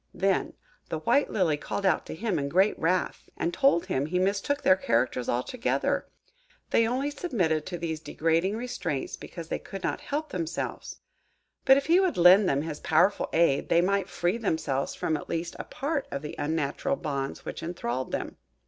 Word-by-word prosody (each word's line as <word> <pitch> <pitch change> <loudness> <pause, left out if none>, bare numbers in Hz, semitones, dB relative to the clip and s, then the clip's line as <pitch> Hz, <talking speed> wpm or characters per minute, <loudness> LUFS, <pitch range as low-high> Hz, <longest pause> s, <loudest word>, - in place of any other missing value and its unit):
Then 195 +2 +1 0.4
the - - -2
white 285 - +2
Lily 170 -7 +1
called 195 +6 -4
out 190 - +2
to - - -6
him 195 -2 -1
in 140 0 -2
great 190 +6 +3
wrath, 180 +2 -1
and 170 - -1
told 270 -11 +3
him 135 +2 -1
he 180 +3 -1
mistook 200 +10 0
their 185 - +6
characters 125 -6 0
altogether. 175 - 0 0.6
They 230 - +4
only 265 +5 -1
submitted 185 - -1
to 180 - -4
these 160 -2 -3
degrading 165 +6 0
restraints 230 - -3
because 170 -2 -9
they - - -2
could 195 -1 -8
not - - -2
help 300 +2 -3
themselves; 165 - -4 0.6
but 265 0 +7
if 280 - -1
he 340 +3 +5
would 375 -3 +1
lend 180 +3 +7
them 140 +1 +1
his 155 -2 -5
powerful 175 +6 +2
aid, 160 -4 +2
they 170 - +5
might 195 +1 +1
free 175 +6 -1
themselves 160 - -1
from 160 - -1
at - - -6
least 170 +1 -3
a - - -5
part 290 -1 -3
of 140 +1 -5
the 150 - -5
unnatural 160 - -1
bonds 140 - -4
which - - -5
enthralled 130 -7 -3
them. - - -4
175 Hz, 185 wpm, -27 LUFS, 155-220 Hz, 0.6 s, but